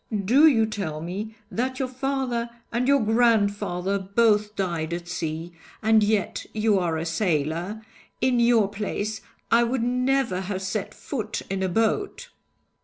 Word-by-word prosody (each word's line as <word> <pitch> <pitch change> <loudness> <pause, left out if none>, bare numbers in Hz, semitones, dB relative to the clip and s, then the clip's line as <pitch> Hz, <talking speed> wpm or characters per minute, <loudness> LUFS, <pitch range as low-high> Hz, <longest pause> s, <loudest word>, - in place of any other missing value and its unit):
Do 275 +10 +6
you 230 -7 +4
tell 195 -8 -4
me 200 +7 -5 0.2
that 255 +2 -2
your 265 - -1
father 255 -2 -2 0.2
and 240 +2 0
your 280 -1 +4
grandfather 205 -4 +2
both 210 +1 +2
died 170 -4 -2
at 175 0 -7
sea, 165 -1 -4 0.3
and 220 0 +5
yet 205 -2 0
you 215 -2 +3
are 170 -3 0
a 160 - -3
sailor? 170 +4 -1 0.3
In 255 -2 +2
your 235 -3 +4
place, 210 +1 -3 0.3
I 235 +1 +6
would 235 0 0
never 250 -5 +1
have 190 0 -4
set 195 +1 -3
foot 220 -6 -4
in 195 -1 -1
a 190 - 0
boat!' 395 - -1
215 Hz, 150 wpm, -25 LUFS, 185-240 Hz, 0.3 s, Do